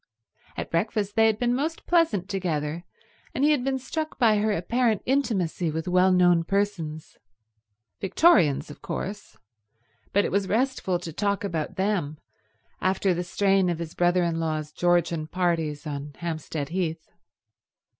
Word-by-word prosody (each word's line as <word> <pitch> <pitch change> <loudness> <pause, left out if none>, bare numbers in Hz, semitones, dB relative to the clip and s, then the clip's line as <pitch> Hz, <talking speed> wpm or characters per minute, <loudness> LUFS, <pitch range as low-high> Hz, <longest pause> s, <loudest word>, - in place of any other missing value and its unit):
At - - -5
breakfast 205 +3 -1
they 225 0 +5
had 220 -1 +1
been 245 +1 +1
most 310 +6 -2
pleasant 315 - +2
together, 170 -4 -2 0.5
and 265 - 0
he 300 - +5
had 285 -5 +2
been 270 0 0
struck 310 +4 -4
by 220 -3 +4
her 215 +1 +1
apparent 225 +4 0
intimacy 200 - 0
with 160 +2 -4
well 180 +1 +4
known 175 -2 +4
persons. 170 -5 -2 0.8
Victorians, 165 - +3
of - - -13
course; 200 - -6 0.7
but 200 - +3
it - - -2
was 200 0 +1
restful 225 -6 0
to 170 -2 -8
talk 200 +3 -1
about 165 -6 -3
them 190 -7 -1 0.6
after 190 0 +1
the 175 +1 -2
strain 195 0 +2
of 170 - -1
his 165 -1 -6
brother 175 0 +2
in 165 -1 -1
law's 155 -2 -2
Georgian 170 -2 +1
parties 165 -4 -1
on 145 -1 -5
Hampstead 160 -3 -4
Heath. 165 -3 -3
180 Hz, 150 wpm, -26 LUFS, 165-210 Hz, 0.8 s, they